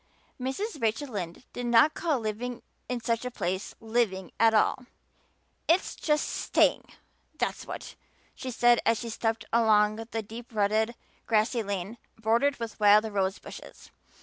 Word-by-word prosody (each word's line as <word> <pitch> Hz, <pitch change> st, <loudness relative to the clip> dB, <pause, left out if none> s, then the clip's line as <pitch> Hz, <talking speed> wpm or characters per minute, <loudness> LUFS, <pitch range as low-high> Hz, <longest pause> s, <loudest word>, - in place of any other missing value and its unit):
Mrs. 290 Hz, -, -3 dB
Rachel 230 Hz, +6 st, 0 dB
Lynde 185 Hz, -2 st, -5 dB
did 245 Hz, 0 st, -4 dB
not 240 Hz, +6 st, +5 dB
call 315 Hz, -6 st, 0 dB
living 235 Hz, +3 st, -4 dB, 0.3 s
in 250 Hz, -1 st, -2 dB
such 230 Hz, 0 st, 0 dB
a 250 Hz, -, -2 dB
place 190 Hz, -5 st, -3 dB
living 220 Hz, -5 st, -1 dB
at 225 Hz, 0 st, +6 dB
all. 235 Hz, +3 st, +2 dB, 0.8 s
"It's 340 Hz, +4 st, +2 dB
just 300 Hz, -1 st, 0 dB
staying, -, -, +2 dB, 0.5 s
that's -, -, -2 dB
what," -, -, -7 dB, 0.4 s
she 260 Hz, -, -6 dB
said 240 Hz, -1 st, +4 dB
as 230 Hz, 0 st, +3 dB
she 235 Hz, -, -5 dB
stepped 225 Hz, 0 st, -1 dB
along 215 Hz, -2 st, +4 dB
the 225 Hz, 0 st, -4 dB
deep 225 Hz, +2 st, -10 dB
rutted, 215 Hz, +3 st, +1 dB, 0.3 s
grassy 225 Hz, +2 st, +2 dB
lane 200 Hz, +2 st, -4 dB, 0.2 s
bordered 235 Hz, +6 st, +2 dB
with 230 Hz, -1 st, -6 dB
wild 210 Hz, 0 st, +6 dB
rose 195 Hz, -1 st, 0 dB
bushes. -, -, -12 dB
225 Hz, 150 wpm, -28 LUFS, 215-245 Hz, 0.8 s, at